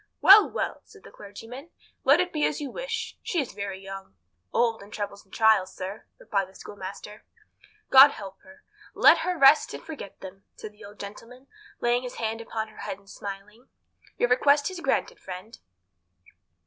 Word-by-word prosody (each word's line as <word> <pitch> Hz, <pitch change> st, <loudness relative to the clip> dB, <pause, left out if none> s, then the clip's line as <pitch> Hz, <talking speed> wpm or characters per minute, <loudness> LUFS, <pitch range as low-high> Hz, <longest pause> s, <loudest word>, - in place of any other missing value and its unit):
"Well, 405 Hz, +2 st, +8 dB
well," -, -, -3 dB
said 415 Hz, -3 st, -19 dB
the -, -, -14 dB
clergyman, 225 Hz, +9 st, -11 dB, 0.3 s
"let 280 Hz, +5 st, +5 dB
it 360 Hz, 0 st, -1 dB
be 300 Hz, -2 st, -1 dB
as -, -, -3 dB
you 285 Hz, -3 st, -5 dB
wish. 485 Hz, -2 st, -5 dB
She 350 Hz, -, -2 dB
is 275 Hz, -, -3 dB
very 200 Hz, -1 st, -5 dB
young." 195 Hz, -, -10 dB, 0.4 s
"Old 230 Hz, -2 st, +1 dB
in 200 Hz, -, -13 dB
troubles 205 Hz, -1 st, -6 dB
and 190 Hz, -, -33 dB
trials, 220 Hz, -4 st, +3 dB
sir," 190 Hz, +3 st, -7 dB
replied 195 Hz, -2 st, -2 dB
the 190 Hz, -, -21 dB
schoolmaster. 205 Hz, +1 st, -9 dB, 0.7 s
"God 270 Hz, +2 st, +10 dB
help 195 Hz, -7 st, -10 dB
her. 285 Hz, 0 st, -18 dB, 0.3 s
Let -, -, +6 dB
her 365 Hz, -1 st, -2 dB
rest 275 Hz, +1 st, +5 dB
and -, -, -10 dB
forget 295 Hz, -11 st, -9 dB
them," 195 Hz, +1 st, -11 dB
said 215 Hz, -, -9 dB
the 210 Hz, +1 st, -17 dB
old 205 Hz, 0 st, -13 dB
gentleman, 230 Hz, +6 st, -10 dB, 0.4 s
laying 240 Hz, +1 st, +2 dB
his 250 Hz, -1 st, -7 dB
hand 225 Hz, 0 st, -3 dB
upon 220 Hz, -1 st, -5 dB
her 215 Hz, -, -19 dB
head, 190 Hz, -, -5 dB
and 200 Hz, 0 st, -25 dB
smiling 200 Hz, +3 st, -9 dB
at 255 Hz, -, -30 dB
her. -, -, -33 dB
"Your 245 Hz, -, +1 dB
request 285 Hz, +6 st, +3 dB
is 370 Hz, -, -7 dB
granted, -, -, -1 dB
friend." 190 Hz, +4 st, -9 dB
220 Hz, 185 wpm, -26 LUFS, 200-280 Hz, 0.7 s, God